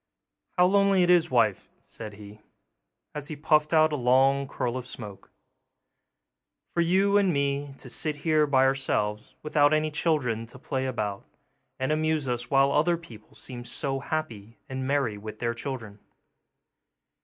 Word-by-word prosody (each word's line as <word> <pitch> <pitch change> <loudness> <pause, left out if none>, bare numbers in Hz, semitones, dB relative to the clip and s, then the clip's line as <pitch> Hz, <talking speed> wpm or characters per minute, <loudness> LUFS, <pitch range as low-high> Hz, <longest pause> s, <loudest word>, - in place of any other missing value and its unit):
'How 180 - +6
lonely 195 0 +4
it 175 - +4
is, 170 -1 +4
wife,' 115 -7 +1
said 110 -2 -10
he, 105 +1 -13 0.7
as 150 -1 -5
he 155 - -6
puffed 150 0 +2
out 155 -1 +4
a - - +1
long 135 +2 +3
curl 125 -2 -3
of 125 -1 -5
smoke, 105 -6 -10 1.4
'for 170 - +1
you 195 +4 +3
and 195 -3 +2
me 140 -1 -1
to 135 - -12
sit 150 +4 -2
here 155 -2 +3
by 135 -2 +4
ourselves, 110 -6 -1
without 150 0 +3
any 155 0 0
children 145 -8 0
to 120 - -12
play 130 0 -3
about 105 -6 -3 0.5
and 130 +2 -1
amuse 155 -2 0
us 120 0 -3
while 135 0 +4
other 165 +4 +2
people 120 -10 -15
seem 125 -2 -8
so 135 +2 -3
happy 115 -7 -5
and 130 -1 -4
merry 135 -7 0
with 110 +1 -8
their 115 0 -1
children! 115 -5 -6
135 Hz, 155 wpm, -27 LUFS, 120-155 Hz, 1.4 s, How